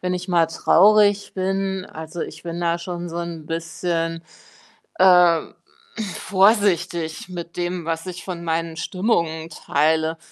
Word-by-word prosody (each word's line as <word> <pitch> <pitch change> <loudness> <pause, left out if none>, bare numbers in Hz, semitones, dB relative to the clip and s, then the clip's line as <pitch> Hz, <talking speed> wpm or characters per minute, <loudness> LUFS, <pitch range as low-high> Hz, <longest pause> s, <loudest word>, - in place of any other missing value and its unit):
wenn 180 0 -1
ich 180 +1 -5
mal 170 -2 +3
traurig 205 +5 +4
bin, 190 0 -1
also 160 +2 -8
ich 155 - -8
bin 170 0 -5
da 170 0 0
schon 175 0 -5
so 165 - -7
'n 170 -2 -6
bisschen, 165 0 -3 0.8
äh, 185 - +5
hm, 175 -4 +5 0.7
vorsichtig 185 -5 +1
mit 170 -1 -7
dem, 175 -1 -3
was 165 +1 -3
ich 180 -1 -7
von 175 -2 -5
meinen 165 0 -2
Stimmungen 170 -6 -1
teile. 160 +2 0
170 Hz, 140 wpm, -22 LUFS, 165-185 Hz, 0.8 s, äh